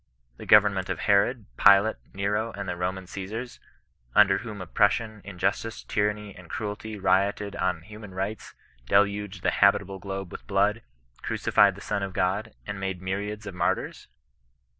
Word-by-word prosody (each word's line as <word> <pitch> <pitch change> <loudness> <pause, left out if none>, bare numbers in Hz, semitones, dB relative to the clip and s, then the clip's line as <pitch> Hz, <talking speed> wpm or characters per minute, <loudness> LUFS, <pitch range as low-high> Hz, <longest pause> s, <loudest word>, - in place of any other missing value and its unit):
The - - -10
govern 105 -1 +7
ment 95 -1 -3
of 95 - -3
Herod, 105 +4 +2
Pilate, 100 +3 +6
Nero, 105 +3 -1
and 100 -1 -6
the 90 - -2
Roman 90 +2 -3
Osesars, 105 +7 -6 0.6
under 100 -2 +6
whom 110 -3 -7
oppression, 105 +4 +1
injustice, 100 +4 -2
tyranny, 105 -1 -1
and 90 -2 -14
cruelty 105 0 -5
rioted 100 +1 +1
on 90 -3 0
human 105 0 -11
rights, 100 +3 -4 0.3
deluged 100 0 +1
the - - +3
habitable 100 -1 +3
globe 95 -1 -5
with - - -9
blood, 100 +3 +2 0.4
crucified 100 -2 +3
the 100 - -11
Son 105 -1 -2
of 95 -1 -4
God, 100 +3 -1
and 105 -1 -5
made 95 -2 -3
myriads 100 +3 -4
of 100 - -6
martyrs 90 -1 -2
100 Hz, 155 wpm, -26 LUFS, 95-105 Hz, 0.6 s, govern